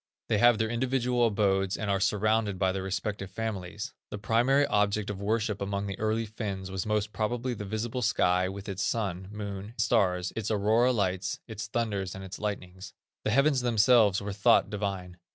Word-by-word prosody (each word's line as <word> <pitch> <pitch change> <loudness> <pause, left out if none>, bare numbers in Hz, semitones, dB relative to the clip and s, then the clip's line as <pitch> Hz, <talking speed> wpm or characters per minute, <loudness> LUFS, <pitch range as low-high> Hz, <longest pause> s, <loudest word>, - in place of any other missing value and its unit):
They 105 - +2
have 120 0 +6
their 110 +1 0
individual 125 0 +1
abodes 95 -3 +1
and 110 - -3
are 100 - +1
surrounded 105 0 +1
by 95 0 +2
their 95 0 -3
respective 95 0 -3
families. 105 +1 -5 0.2
The - - -5
Primary 120 +7 +3
object 105 -3 +1
of 100 -1 -7
worship 105 0 -1
among 100 0 -2
the 100 -1 -5
early 110 +1 0
Finns 100 -3 -5
was 95 +1 -3
most 105 0 0
probably 120 +3 -1
the 105 -2 -6
visible 110 +5 -3
sky 95 -5 +2
with 100 +1 -8
its 100 -1 -4
sun, 95 -5 -1
moon, 100 -2 -5
and 110 - -11
stars, 95 -5 +2
its 110 -2 -2
aurora 110 +4 +3
lights, 95 -5 -1
its 110 -1 -6
thunders 105 -5 -2
and 95 - -7
its 95 0 -8
lightnings. 95 -2 -5 0.3
The - - +2
heavens 135 +3 +3
themselves 115 -4 +4
were 100 0 -4
thought 100 0 +4
divine. 95 -4 -4
105 Hz, 185 wpm, -29 LUFS, 95-115 Hz, 0.3 s, have